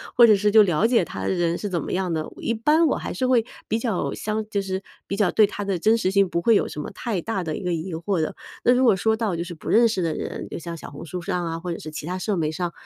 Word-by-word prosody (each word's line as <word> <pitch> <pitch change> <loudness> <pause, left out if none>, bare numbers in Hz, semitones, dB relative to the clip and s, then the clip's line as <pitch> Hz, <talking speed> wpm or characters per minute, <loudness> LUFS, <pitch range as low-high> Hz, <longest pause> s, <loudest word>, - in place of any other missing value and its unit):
或 240 - +8
者 215 -3 +6
是 210 +1 +2
就 215 0 +8
了 180 +2 +2
解 235 0 +3
他 - - -6
的 - - -1
人 170 -1 0
是 210 - -4
怎 175 -4 -1
么 - - -5
样 185 -2 -1
的。 155 -1 -3
一 230 - -1
般 300 +9 +3
我 - - +1
还 - - -5
是 255 - -1
会 245 -3 +3 0.2
比 220 - 0
较 225 -5 -1
相 215 0 -3
就 200 -2 0
是 190 -1 -3 0.2
比 200 - -4
较 200 -4 +2
对 215 - +5
他 205 0 -5
的 195 -2 0
真 220 +7 +3
实 185 - 0
性 195 -1 +3
不 170 - -1
会 225 +5 +4
有 - - +3
什 - - -7
么 - - -6
太 225 -7 -3
大 195 +1 -2
的 155 -2 -3
一 - - -7
个 180 -1 0
疑 170 +2 -4
惑 170 +2 -1
的。 155 - -2 0.3
那 - - +5
如 255 +1 +3
果 230 - +5
说 220 +4 +1
到 220 -6 -1
就 170 - -2
是 175 0 -7
不 160 - -12
认 235 +2 +5
识 205 -4 -1
的 165 -2 0
人， - - -5
就 - - -5
像 170 0 -6
小 - - -9
红 145 +3 -9
书 180 +2 -5
上 175 +1 -2
啊， 165 0 -3
或 175 0 -4
者 - - -7
是 155 - -8
其 155 -1 -6
它 180 +3 -3
社 195 +1 -1
媒 155 -2 0
上， 175 +1 -2
190 Hz, 340 characters per minute, -24 LUFS, 170-220 Hz, 0.3 s, 或